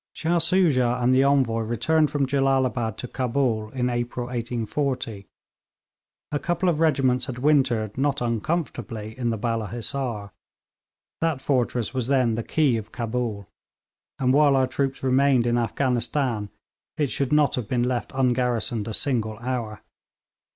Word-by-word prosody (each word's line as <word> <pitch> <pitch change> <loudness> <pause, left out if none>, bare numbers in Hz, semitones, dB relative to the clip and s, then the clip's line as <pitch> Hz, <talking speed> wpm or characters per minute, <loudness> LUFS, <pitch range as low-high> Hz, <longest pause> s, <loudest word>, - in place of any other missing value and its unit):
Shah 170 +1 0
Soojah 155 -8 +3
and 125 +1 +3
the 130 +1 +5
Envoy 135 -5 +2
returned 140 +8 +1
from 145 -2 0
Jellalabad 130 -4 +1
to 125 - -5
Cabul 120 -4 -1
in 125 +1 -1
April 120 0 -2
1840. 120 -2 -3 1.0
A 145 - 0
couple 175 +3 -1
of 160 -3 0
regiments 130 -6 +2
had 125 - -5
wintered 125 -6 +2
not 145 0 +1
uncomfortably 115 -3 -3
in 120 -2 -1
the 115 - -1
Balla 115 0 -2
Hissar. 115 -3 -4 0.9
That 165 -4 0
fortress 125 -4 0
was 130 -3 -2
then 130 -4 +2
the 115 - -2
key 135 -1 +1
of 105 -1 -7
Cabul, 115 -4 -3 0.7
and 130 -1 +2
while 145 -1 +5
our 130 -1 +3
troops 135 +1 -2
remained 130 -1 +3
in 120 0 +2
Afghanistan 120 -2 -1 0.5
it 145 -4 0
should 140 -1 -1
not 150 -1 +3
have 125 -5 -2
been 120 +1 0
left 125 -1 -2
ungarrisoned 120 -4 0
a 110 - -1
single 110 -6 0
hour. 120 -3 -4
125 Hz, 145 wpm, -24 LUFS, 115-140 Hz, 1.0 s, the